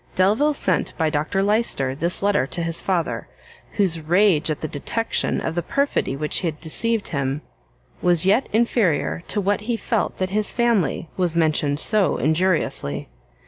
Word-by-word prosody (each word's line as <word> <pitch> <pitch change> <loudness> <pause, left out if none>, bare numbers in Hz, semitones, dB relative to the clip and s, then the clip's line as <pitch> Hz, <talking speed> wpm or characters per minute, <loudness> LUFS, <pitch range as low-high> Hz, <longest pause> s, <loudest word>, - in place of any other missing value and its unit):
Delvile 220 +11 +3
sent - - -1
by 160 -2 +1
Dr 155 +6 0
Lyster 205 - +1
this 170 +7 -1
letter 200 -10 +2
to 170 - -3
his 165 0 -2
father, 180 -4 -1 0.5
whose 185 -6 +1
rage 170 0 +2
at 155 - -2
the 155 - -2
detection 190 +10 -1
of 165 - -3
the 175 - -1
perfidy 280 - -1
which 150 +2 0
had 160 -5 -3
deceived 220 +7 -1
him, 140 0 -2 0.6
was 175 -2 +3
yet 210 +7 +3
inferior 180 - +1
to - - -1
what 205 +1 0
he 230 +2 -2
felt 225 -1 -1
that 185 0 -2
his 210 +1 0
family 230 - +1
was 175 -3 0
mentioned 155 -3 +1
so 210 +2 +3
injuriously. 160 - 0
180 Hz, 160 wpm, -22 LUFS, 155-210 Hz, 0.6 s, Delvile